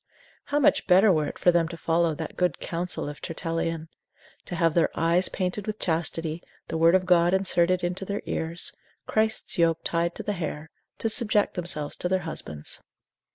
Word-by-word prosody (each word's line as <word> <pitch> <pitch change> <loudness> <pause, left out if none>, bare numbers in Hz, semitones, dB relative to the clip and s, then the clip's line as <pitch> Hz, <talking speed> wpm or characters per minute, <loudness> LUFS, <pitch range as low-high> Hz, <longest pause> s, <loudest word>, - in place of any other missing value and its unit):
How 285 - -1
much 290 - +3
better 190 +3 +6
were 155 -4 +1
it - - -6
for 180 - +4
them 170 -1 +2
to 170 0 -8
follow 165 -1 +1
that 160 +1 -6
good 180 -4 0
counsel 175 -1 -3
of 145 0 -7
Tertullian? 165 -1 -3 0.6
To 175 - -5
have 165 -1 +2
their 170 -1 +3
eyes 170 +3 +2
painted 190 +2 -3
with 215 0 -3
chastity, 165 -1 -1 0.3
the 160 - -2
Word 165 +2 +6
of 185 0 +2
God 175 0 +4
inserted 185 -1 +2
into 180 +2 -2
their 200 +2 -4
ears, 165 +2 -3 0.3
Christ's 220 -3 0
yoke 165 -1 +3
tied 170 0 0
to - - -6
the 205 - -1
hair, 155 -3 -5 0.3
to - - -1
subject 215 -2 +3
themselves 165 -4 -2
to 180 - -2
their 185 0 +1
husbands. 75 - -6
170 Hz, 185 wpm, -26 LUFS, 165-185 Hz, 0.6 s, better